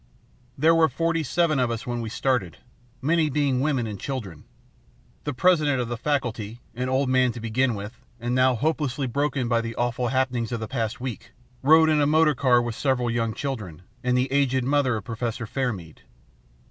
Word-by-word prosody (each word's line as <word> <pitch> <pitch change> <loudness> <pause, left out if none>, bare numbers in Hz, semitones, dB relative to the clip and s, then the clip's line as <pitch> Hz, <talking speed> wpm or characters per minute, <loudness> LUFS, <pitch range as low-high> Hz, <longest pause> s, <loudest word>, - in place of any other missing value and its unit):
"There 160 +4 +5
were 165 -1 +4
forty 165 -1 0
seven 155 0 +1
of 125 -2 +2
us 115 -1 -4
when 120 -1 -3
we 115 - -4
started, 115 - -1 0.5
many 160 +1 +2
being 140 -3 +1
women 135 -4 0
and 105 -3 -6
children. 105 - -6 0.8
The 145 - -1
President 150 -2 +3
of 120 -2 -2
the 120 - -2
Faculty, 120 -5 -2
an 125 +2 -3
old 130 +1 +1
man 130 -1 +3
to 120 - -7
begin 115 +2 0
with, 105 +3 -6 0.3
and 120 +1 -2
now 130 0 +4
hopelessly 145 0 -1
broken 135 0 -1
by 115 -1 +2
the 115 0 -5
awful 120 0 -1
happenings 125 -3 0
of 120 - -2
the 110 - -4
past 115 -2 -3
week, 120 -2 -6 0.3
rode 160 +3 +6
in 155 -1 +3
the 145 - +3
motor 155 0 +4
car 125 -2 +3
with 120 -1 -3
several 125 -1 0
young 115 -1 -1
children 105 - -5 0.2
and 125 0 +2
the 130 +1 0
aged 135 -2 +2
mother 135 -2 +2
of 110 - -4
Professor 115 -1 -4
Fairmead. 105 - -3
125 Hz, 190 wpm, -25 LUFS, 115-140 Hz, 0.8 s, rode